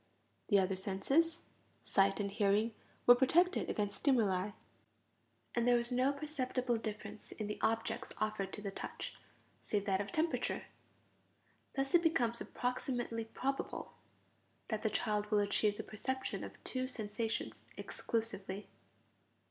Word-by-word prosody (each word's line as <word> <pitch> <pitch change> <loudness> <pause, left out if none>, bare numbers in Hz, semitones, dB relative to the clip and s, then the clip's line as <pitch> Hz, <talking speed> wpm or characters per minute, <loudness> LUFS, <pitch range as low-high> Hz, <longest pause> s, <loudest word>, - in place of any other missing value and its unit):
The 205 - +5
other 190 0 +3
senses, 270 - +1 0.4
sight 195 +1 +3
and 200 -1 -1
hearing, 210 +2 +3 0.3
were 245 - +11
protected 335 +9 +4
against 205 -1 -1
stimuli; 210 -8 +3 1.0
and 235 0 +2
there 245 - +6
was 235 +1 -1
no 255 +2 +3
perceptible 260 -4 -1
difference 215 -1 -6
in 215 - -4
the 210 0 -4
objects 225 0 0
offered 215 -2 -1
to 210 - -6
the 200 - -2
touch - - -5 0.5
save 205 -2 -1
that 195 -1 +2
of 200 -1 -5
temperature. 320 +1 0 1.1
Thus 270 0 0
it 345 - +7
becomes 240 -9 +2
approximately 245 -2 -2
probable 270 +4 -3 0.8
that 220 -2 -1
the 220 - +2
child 210 -1 0
will 210 - +3
achieve 205 0 +2
the - - -3
perception 260 +5 -3
of - - -6
two 255 0 -2
sensations 225 -2 -2 0.2
exclusively. 210 -3 -3
225 Hz, 130 wpm, -36 LUFS, 205-255 Hz, 1.1 s, were